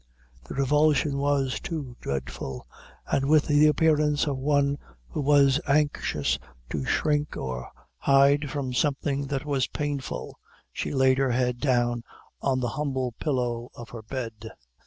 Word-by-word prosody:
The - - -7
revulsion 145 +1 +2
was 140 -5 +1
too 145 -6 -5
dreadful; 65 -1 -4 0.4
and 135 0 0
with 155 -1 +5
the 150 0 +5
appearance 150 -1 +3
of 145 -2 -1
one 140 +1 +1 0.3
who - - -3
was 140 -1 +4
anxious 145 - +1 0.3
to 75 -3 -2
shrink 150 -1 0
or 65 -1 -4 0.3
hide 140 +1 +4
from 135 -3 -3
something 140 +1 0
that 135 0 -3
was 140 -3 0
painful, 145 -2 -4 0.3
she - - -3
laid 130 -1 +3
her 135 -1 +2
head 125 0 0
down 120 -3 +1 0.4
on 130 -2 +1
the 120 - 0
humble 130 -3 -2
pillow 125 -4 -1
of 120 0 -10
her 115 - -8
bed. 115 -2 -6
135 Hz, 140 wpm, -26 LUFS, 125-145 Hz, 0.4 s, with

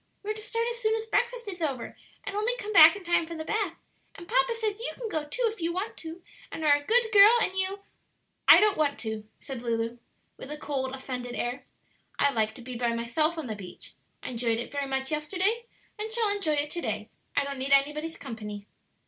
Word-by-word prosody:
We're 425 +1 -2
to 430 - -8
start 460 +2 -2
as 470 - -7
soon 440 -1 +2
as 445 0 -3
breakfast 475 0 -1
is 360 -3 -6
over, 275 -7 -2 0.3
and 400 - -5
only 455 +4 0
come 430 -3 -5
back 330 -1 +9
in 400 - -9
time 345 -1 +1
for 335 - -6
the 315 -1 -5
bath; 405 -5 -1 0.4
and 340 - -11
papa - - +2
says 435 -2 -2
you 470 - -3
can 470 -3 -5
go 310 -6 -2
too - - -3
if 440 -4 -2
you 335 +1 0
want 380 +5 -3
to, 330 +1 -8 0.3
and 320 - -4
are 295 - +7
a 290 - -3
good 460 +6 +3
girl; 410 +1 +9
and 380 -4 0
you 380 +1 0 0.3
" - - -48
"I - - +10
don't 420 -5 +3
want 290 -2 +2
to," 220 -1 -5
said 265 -4 -7
Lulu, 230 0 -2 0.4
with 265 - -9
a 300 - -5
cold, 265 -3 -3
offended 250 -2 -5
air. 245 +3 -3 0.5
"I 285 - +4
like 220 -3 0
to 245 - -10
be 250 +1 -6
by 235 -1 0
myself 305 +8 +1
on 320 - -4
the 220 -3 -4
beach; 190 -3 -10 0.3
I - - -4
enjoyed 230 -1 0
it 235 - -5
very 285 -1 -2
much 265 +1 -2
yesterday, 375 +10 0 0.3
and 435 +1 -4
shall 445 -3 +2
enjoy 335 -7 0
it 295 0 +1
to 345 - -3
day; 215 -3 -3 0.2
I 285 - +3
don't 280 -1 -5
need 270 +1 -2
anybody's 300 +4 +2
company." 210 -5 -7
315 Hz, 235 wpm, -28 LUFS, 260-420 Hz, 0.5 s, I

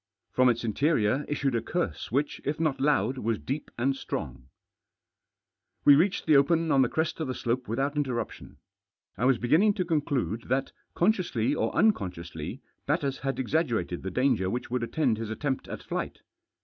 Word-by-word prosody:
From 130 0 +4
its 120 -1 0
interior 130 +2 +1
issued 140 -2 0
a 115 - +1
curse 175 +9 -3
which, 140 +4 -1
if 145 +2 -1
hot 155 -5 0
loud, 135 -3 +2
was 115 -2 0
deep 140 +7 -4
and 135 +3 +1
strong; 65 - -5 1.4
We 145 - +9
reached 180 +7 +2
the 155 - +5
open 160 +3 +3
on 135 - +5
the 125 - +3
crest 160 +1 -1
of 160 - -2
the 130 - -3
slope 120 +2 -2
without 135 +6 -1
irtterruptioh. 130 -5 -3 0.6
I 120 - -1
Was 130 -2 +4
beginning 160 - +3
to 185 - -1
conclude 140 - -1
that, 135 +2 0 0.2
consciously 170 - +1
or - - 0
unconsciously, 90 - -1 0.2
Batters 140 -2 0
had 135 0 -2
ex 130 - -3
aggerated 115 - 0
the 95 - -4
dahgef* 125 -4 +1
which 120 +3 -4
would 125 -1 0
attend 120 -2 0
his 115 -1 -4
atfeiftjat 130 +4 -2
at - - -6
flight. - - -4
135 Hz, 175 wpm, -28 LUFS, 115-150 Hz, 1.4 s, We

